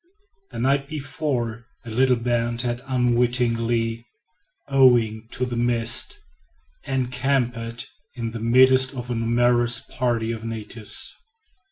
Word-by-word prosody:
The 120 - -9
night 135 +3 +1
before, 130 -6 -3 0.2
the 115 - -8
little 130 +2 +3
band 120 0 -1
had 120 0 -2
unwittingly, 120 -2 +1 0.6
owing 120 -5 +3
to 125 - -1
the 120 -1 -4
mist, 120 -1 +1 0.7
encamped 125 -3 -1 0.3
in 115 -2 -4
the 115 - -6
midst 130 +3 +4
of 125 -1 -6
a - - 0
numerous 120 +1 +2
party 115 -2 -2
of 115 -1 -6
natives. 110 -1 -5
120 Hz, 115 wpm, -23 LUFS, 115-130 Hz, 0.7 s, midst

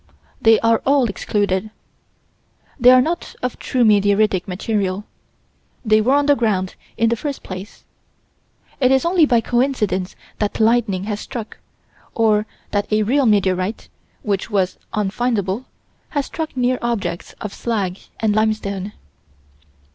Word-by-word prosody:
They 225 0 +6
are 230 0 +3
all 275 -1 +3
excluded. 200 -1 -1 1.1
They 250 0 +7
are 255 0 +7
not 340 +4 -3
of 250 - -3
true 250 -2 0
meteoritic 205 -2 +3
material. 195 0 -2 0.8
They 215 0 +4
were 255 +6 +3
on 290 0 +3
the 290 - +5
ground 200 -7 0 0.2
in 230 +1 +3
the 235 - +1
first 280 +4 -5
place. 185 +2 -9 1.0
It 255 -2 +3
is 265 +4 +3
only 340 -3 +4
by 240 -4 +3
coincidence 235 -7 0 0.2
that 210 +1 -1
lightning 220 -4 +2
has 205 0 -3
struck, 225 -1 -7 0.6
or 215 -1 +2 0.2
that 205 0 -1
a 215 0 +3
real 260 +4 +2
meteorite, 195 -1 +1 0.3
which 200 -2 -1
was 190 -4 0
unfindable, 210 +1 -1 0.4
has 285 -3 -1
struck 315 -4 -5
near 250 0 +1
objects 195 -8 -3
of 210 - -6
slag 200 -6 -2 0.2
and 215 -2 +1
limestone. 210 -2 -1
215 Hz, 135 wpm, -20 LUFS, 200-245 Hz, 1.1 s, They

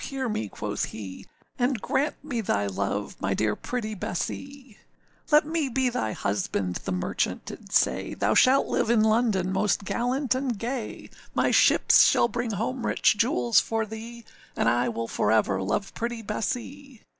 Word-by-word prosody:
hear 270 -2 -3
me,â 110 - -3
quoth - - -3
he, 95 -4 -9 0.3
âAnd 245 -1 +1
grant 285 +8 0
me 250 -6 -2
thy 105 - 0
love, 100 +1 -3
my 95 +1 0
dear 105 +1 +1
pretty 225 -3 -4
Bessee.â 265 +7 -5 0.6
âLet 300 0 +6
me 315 -3 -1
be 260 +1 +1
thy 170 - -2
husband,â 100 -3 -2
the - - -2
merchant 90 -1 -2
did - - -10
say, 65 - +1
âThou 105 +2 +1
shalt 265 +2 +5
live - - 0
in 230 -2 +4
London 215 -5 +2
most 200 +1 +1
gallant 255 +5 0
and 255 -3 -2
gay; 235 +1 -5 0.3
My - - +2
ships - - +6
shall - - +4
bring 240 0 -3
home 245 +5 -2
rich - - +3
jewels 235 - +3
for 225 -1 -1
thee, 225 +2 -9 0.3
And - - +1
I 120 +1 +2
will 115 0 -3
for - - 0
ever 105 -3 +2
love 105 - -2
pretty 235 -1 -4
Bessee. 250 +4 -5
225 Hz, 170 wpm, -26 LUFS, -, 0.6 s, âLet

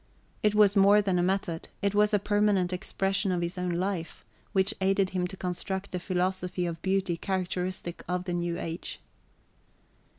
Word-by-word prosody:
It 210 0 +2
was 210 -1 +5
more 200 +1 +6
than 195 -3 +1
a - - +3
method: 180 -3 -1 0.2
it 200 0 +2
was 210 +1 +4
a 210 - +4
permanent 205 -3 +2
expression 195 +1 0
of 180 -1 0
his 170 +2 -2
own 180 -1 -2
life, 175 -1 -3 0.3
which 195 +2 +2
aided 195 0 +2
him 180 -1 0
to 190 - -9
construct 190 +2 -3
a 180 - -1
philosophy 180 0 -1
of 165 -1 -4
beauty 190 -2 +1
characteristic 180 -1 -3
of 180 0 -1
the 180 -1 -3
new 175 0 -1
age. 165 0 -5
185 Hz, 170 wpm, -28 LUFS, 180-195 Hz, 0.3 s, more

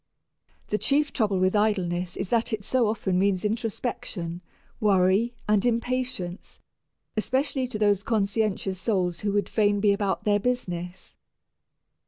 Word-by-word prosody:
The 210 - 0
chief 290 +1 +2
trouble 210 -6 +1
with 185 +2 +2
idleness 185 -4 0
is 190 - -3
that 235 0 +1
it 210 -2 -2
so 245 +1 +2
often 190 -4 0
means 195 0 +1
introspection, 215 -5 -3 0.4
worry, 200 +3 +3
and 210 -2 +3
impatience, 245 -6 -2 0.6
especially 260 +4 0
to 245 - -4
those 205 -2 +2
conscientious 200 -3 0
souls 185 -5 0
who 205 - -1
would 205 -2 +1
fain 205 -2 +2
be 200 0 +4
about 200 -1 -1
their 205 -1 +2
business. 180 -7 -4
205 Hz, 135 wpm, -26 LUFS, 185-230 Hz, 0.6 s, be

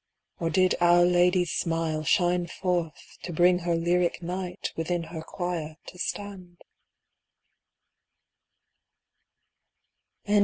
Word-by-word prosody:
Or 165 - 0
did 185 +3 +3
Our 175 0 +6
Lady's 180 0 +3
smile 165 -2 -1
shine 175 +2 +2
forth, 175 -2 -3
to 175 - -6
bring 180 +2 +4
Her 170 -1 0
lyric 175 +1 0
Knight 180 +1 -4
within 170 +1 -2
her 160 0 -7
choir 165 -2 -4
to 180 - -12
stand? 185 -3 -5
175 Hz, 100 wpm, -27 LUFS, 165-180 Hz, -, Our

